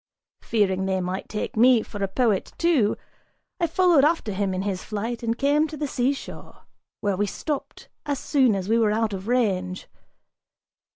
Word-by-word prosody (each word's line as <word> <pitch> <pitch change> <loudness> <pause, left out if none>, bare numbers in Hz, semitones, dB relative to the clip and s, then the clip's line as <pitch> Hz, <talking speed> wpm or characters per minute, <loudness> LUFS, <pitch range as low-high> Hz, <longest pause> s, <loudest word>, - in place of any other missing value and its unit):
Fearing 190 -4 0
they 190 -1 0
might 185 +1 -4
take 210 - -4
me 240 0 +5
for 205 -2 -6
a - - +1
poet, 210 -1 0
too, 310 -12 +2 0.6
I 340 - +2
followed 340 -3 +4
after 305 -8 +1
him 195 0 -1
in 185 0 -2
his 195 -2 -3
flight 225 +3 -4
and 230 0 -1
came 290 +3 +2
to 305 - -8
the 295 - -2
seashore, 265 +1 -3 0.4
where 200 -2 0
we 205 +2 0
stopped 290 +8 -5 0.2
as 285 -1 0
soon 260 -5 +2
as 190 -1 -3
we 225 +2 +3
were 215 -2 +3
out 220 0 0
of 190 +1 -6
range. 190 -7 0
225 Hz, 175 wpm, -24 LUFS, 195-270 Hz, 0.6 s, me